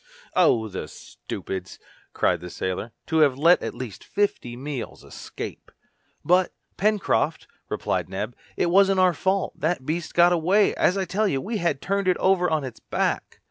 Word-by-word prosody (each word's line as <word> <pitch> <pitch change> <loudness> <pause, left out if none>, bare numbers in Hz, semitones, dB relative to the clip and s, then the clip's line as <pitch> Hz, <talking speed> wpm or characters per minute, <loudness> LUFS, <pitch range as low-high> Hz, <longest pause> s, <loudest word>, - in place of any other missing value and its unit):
"Oh! 120 -11 +4
the 95 -6 -6
stupids!" 95 +4 -7 0.3
cried - - +1
the 90 - -7
sailor, 95 +6 -4
"to 160 - -1
have 140 -4 +4
let 170 +5 +5
at - - -4
least 120 -7 -7
fifty 200 -12 -1
meals 135 -1 -6
escape!" - - -8 0.5
"But, 180 +3 +3 0.2
Pencroft," 210 +1 +1 0.2
replied - - -2
Neb, 105 +5 -4 0.2
"it 170 - +1
wasn't 195 0 +5
our 185 -1 +5
fault 190 +4 -1
that 160 +3 +1
the 130 - -21
beast 160 +4 -3
got 175 +1 +6
away, 185 +5 +3
as 185 - +2
I 190 - 0
tell 205 +4 0
you, 135 -8 0
we 220 - -3
had 170 -7 -1
turned 200 0 0
it 185 - +3
over 185 -1 +3
on 155 -2 0
its 130 -3 -7
back!" - - -2
170 Hz, 175 wpm, -24 LUFS, 130-190 Hz, 0.5 s, got